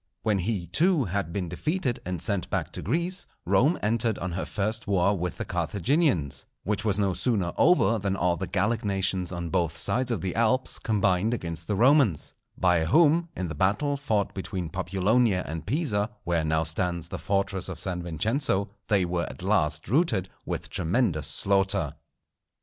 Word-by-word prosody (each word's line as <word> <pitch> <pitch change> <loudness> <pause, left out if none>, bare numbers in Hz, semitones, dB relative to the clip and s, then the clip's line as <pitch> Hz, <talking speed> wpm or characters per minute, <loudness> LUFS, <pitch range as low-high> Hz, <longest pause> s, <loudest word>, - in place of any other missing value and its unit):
When 105 -3 +1
he, 95 -1 -1
too, 155 - +2
had 95 -2 -2
been 90 0 -2
defeated, 130 - -2
and 90 -1 -3
sent 100 -4 -1
back - - -2
to - - -4
Greece, 170 - -1 0.2
Rome 150 +8 +3
entered 110 0 +1
on 90 +1 -4
her 90 +2 -3
first 110 +2 -2
war 100 0 +2
with 90 -2 -3
the - - -4
Carthaginians; 105 - 0 0.2
which 105 +2 -1
was 105 -3 +2
no 100 -2 +1
sooner 95 -6 0
over 150 -9 +4
than 100 -1 -1
all 90 -2 +1
the 95 +1 -4
Gallic 105 +4 0
nations 95 -3 0
on 85 -2 -4
both 85 -3 0
sides 125 +9 0
of 115 -8 -1
the 95 -2 -2
Alps 115 +3 +2
combined 105 +1 +1
against 85 -5 -5
the 105 - 0
Romans, 125 - +3 0.2
by 90 -3 +3
whom, 165 - +4
in 90 - -2
the 75 - -5
battle 105 - +1
fought 110 -8 -1
between 95 -3 -4
Populonia 95 +2 +1
and 80 +1 -6
Pisa, 110 - 0
where 85 -3 0
now 80 +1 +1
stands 85 0 -2
the - - -5
fortress 100 -1 -1
of 90 - -6
San 90 -2 -3
Vincenzo, 100 - 0 0.2
they 100 -4 +3
were 85 0 -1
at - - -10
last 80 -6 +1
routed 120 - +1 0.2
with - - -4
tremendous 90 - 0
slaughter. 95 -5 +1
100 Hz, 175 wpm, -27 LUFS, 90-115 Hz, 0.2 s, over